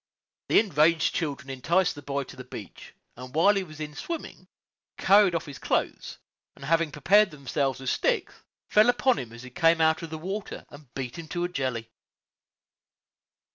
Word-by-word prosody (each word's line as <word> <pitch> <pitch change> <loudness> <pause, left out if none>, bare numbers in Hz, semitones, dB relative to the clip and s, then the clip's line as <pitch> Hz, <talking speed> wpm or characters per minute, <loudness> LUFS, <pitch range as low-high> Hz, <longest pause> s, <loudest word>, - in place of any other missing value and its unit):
The - - +6
enraged 165 -5 +3
children 140 -5 -3
enticed 170 +8 +1
the 145 - -10
boy 140 0 -3
to 130 - -12
the 130 - -9
beach, 110 -5 -11 0.2
and 125 +2 -10
while 195 +6 +5
he 195 - 0
was 155 -3 -12
in 150 -1 -5
swimming, 335 - -7 0.5
carried 195 -2 +5
off 165 - -2
his 140 -3 -9
clothes, - - -2 0.4
and, 135 - -10
having 165 +1 +2
prepared 200 +8 +4
themselves 140 -2 -2
with 130 -1 -2
sticks, - - 0 0.3
fell 215 +3 +5
upon 250 +1 +2
him 120 -3 -7
as 115 +2 -11
he 130 - -10
came 165 -1 +3
out 160 0 +3
of 165 - -6
the 160 - -5
water, 195 +6 -6
and 145 -4 -14
beat 130 +3 -5
him 165 - -8
to 175 +2 -3
a 175 - -1
jelly. 125 -8 -3
155 Hz, 180 wpm, -27 LUFS, 135-175 Hz, 0.5 s, The